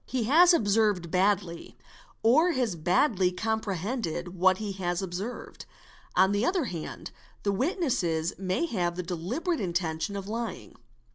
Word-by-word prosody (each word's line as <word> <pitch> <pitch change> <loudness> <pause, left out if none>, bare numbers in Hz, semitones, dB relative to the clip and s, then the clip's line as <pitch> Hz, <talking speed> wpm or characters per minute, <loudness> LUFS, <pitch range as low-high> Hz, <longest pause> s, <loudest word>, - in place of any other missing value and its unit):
He 255 -3 -1
has 330 +10 +6
observed 205 - +2
badly 185 -2 0 0.5
or 310 +10 +4
has 245 - 0
badly 180 - +2
comprehended 200 -2 -2
what 185 +1 +4
he 210 -1 -4
has 175 -2 -2
observed. 190 +6 -6 0.5
On 190 +2 +5
the 205 +2 +1
other 355 +3 +1
hand 170 -8 -6 0.3
the 200 - +1
witness 275 - 0 0.4
may 190 - 0
have 175 - -1
the 180 - -3
deliberate 220 - -2
intention 175 +1 -2
of 195 -1 -5
lying. 225 -2 -5
200 Hz, 135 wpm, -28 LUFS, 180-240 Hz, 0.5 s, has